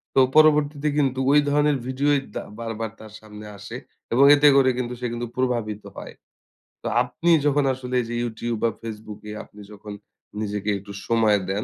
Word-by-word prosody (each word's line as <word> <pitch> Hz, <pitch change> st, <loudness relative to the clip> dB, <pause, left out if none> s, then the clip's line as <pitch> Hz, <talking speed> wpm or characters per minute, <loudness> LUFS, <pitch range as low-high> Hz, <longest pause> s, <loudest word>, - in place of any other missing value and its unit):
তো -, -, +5 dB, 0.2 s
পরবর্তীতে 150 Hz, -1 st, +4 dB
কিন্তু 135 Hz, -3 st, +1 dB
ঐ -, -, +4 dB, 0.2 s
ধরনের 145 Hz, -1 st, +2 dB
ভিডিও 135 Hz, +3 st, 0 dB, 0.3 s
দা -, -, -3 dB, 0.2 s
বারবার 115 Hz, -1 st, -4 dB
তার 110 Hz, -1 st, -12 dB
সামনে 105 Hz, 0 st, -11 dB
আসে। 100 Hz, -, -9 dB, 0.4 s
এবং 135 Hz, +4 st, +6 dB
এতে 145 Hz, +1 st, +5 dB
করে 135 Hz, -1 st, +5 dB
কিন্তু 125 Hz, -1 st, -3 dB
সে -, -, -3 dB
কিন্তু 120 Hz, 0 st, -4 dB
প্রভাবিত 115 Hz, -5 st, -1 dB
হয়। -, -, -8 dB, 0.7 s
তো -, -, -3 dB, 0.2 s
আপনি 170 Hz, +1 st, -1 dB
যখন 145 Hz, 0 st, +3 dB
আসলে 125 Hz, -1 st, -5 dB
এই -, -, -5 dB
যে 120 Hz, -, -3 dB
YouTube 120 Hz, 0 st, -3 dB
বা 115 Hz, -, +4 dB
Facebook 110 Hz, -2 st, -8 dB
এ -, -, -5 dB
আপনি 105 Hz, -, -15 dB
যখন 105 Hz, 0 st, -9 dB, 0.5 s
নিজেকে 105 Hz, -1 st, -3 dB
একটু 100 Hz, +1 st, -11 dB, 0.2 s
সময় 110 Hz, -3 st, +3 dB
দেন, 100 Hz, +2 st, -1 dB
120 Hz, 180 wpm, -23 LUFS, 105-140 Hz, 0.7 s, এবং